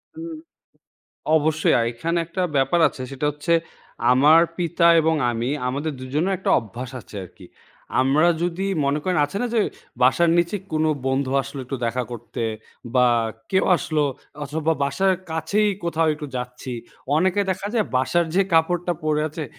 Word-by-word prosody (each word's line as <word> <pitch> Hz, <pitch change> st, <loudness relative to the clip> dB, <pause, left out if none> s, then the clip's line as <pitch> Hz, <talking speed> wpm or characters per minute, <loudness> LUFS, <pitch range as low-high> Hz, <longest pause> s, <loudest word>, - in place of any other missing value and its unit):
হুম, 330 Hz, 0 st, -7 dB, 1.0 s
অবশ্যই। 155 Hz, 0 st, +1 dB
আর 115 Hz, -, +2 dB
এখানে 165 Hz, +8 st, -2 dB
একটা 170 Hz, +3 st, -4 dB
ব্যাপার 140 Hz, +6 st, +2 dB
আছে। -, -, -8 dB
সেটা 135 Hz, +2 st, -3 dB
হচ্ছে 150 Hz, +4 st, -1 dB, 0.6 s
আমার 150 Hz, +6 st, +6 dB, 0.2 s
পিতা 170 Hz, -1 st, +1 dB, 0.2 s
এবং 160 Hz, 0 st, +2 dB, 0.2 s
আমি, 120 Hz, +2 st, -2 dB, 0.2 s
আমাদের 145 Hz, +5 st, -2 dB
দুজনের 150 Hz, +9 st, -1 dB
একটা -, -, -2 dB
অভ্যাস 120 Hz, +3 st, -8 dB
আছে 105 Hz, -, -14 dB
আরকি। 90 Hz, +1 st, -14 dB, 0.6 s
আমরা 145 Hz, +6 st, +3 dB, 0.2 s
যদি 180 Hz, +2 st, -1 dB, 0.2 s
মনে 140 Hz, +2 st, +1 dB
করেন 185 Hz, -2 st, 0 dB
আছে 150 Hz, +7 st, -6 dB
না? 245 Hz, -, 0 dB
যে 220 Hz, -, +4 dB, 0.4 s
বাসার 165 Hz, +7 st, +4 dB
নিচে 170 Hz, +4 st, +1 dB, 0.2 s
কোনো 155 Hz, 0 st, +2 dB, 0.2 s
বন্ধু 130 Hz, 0 st, 0 dB
আসলো, 135 Hz, +1 st, -8 dB
একটু 135 Hz, +1 st, -4 dB
দেখা 125 Hz, +2 st, -1 dB
করতে 120 Hz, 0 st, -6 dB, 0.5 s
বা 125 Hz, -1 st, +5 dB, 0.4 s
কেউ 190 Hz, -, +3 dB
আসলো 155 Hz, -2 st, 0 dB, 0.4 s
অথবা 155 Hz, +3 st, -1 dB
বাসার 190 Hz, +7 st, +2 dB, 0.2 s
কাছেই 200 Hz, +7 st, +1 dB
কোথাও 165 Hz, -1 st, +1 dB
একটু 150 Hz, -1 st, -7 dB
যাচ্ছি। 125 Hz, +1 st, -5 dB, 0.5 s
অনেকে 185 Hz, +4 st, +2 dB
দেখা 190 Hz, +2 st, -4 dB
যায় 225 Hz, -3 st, +2 dB
বাসার 150 Hz, +7 st, +2 dB
যে 195 Hz, -, +5 dB
কাপড়টা 175 Hz, +2 st, +2 dB
পরে 150 Hz, -1 st, +1 dB
আছে, 155 Hz, +1 st, -6 dB
155 Hz, 155 wpm, -23 LUFS, 130-175 Hz, 1.0 s, আমার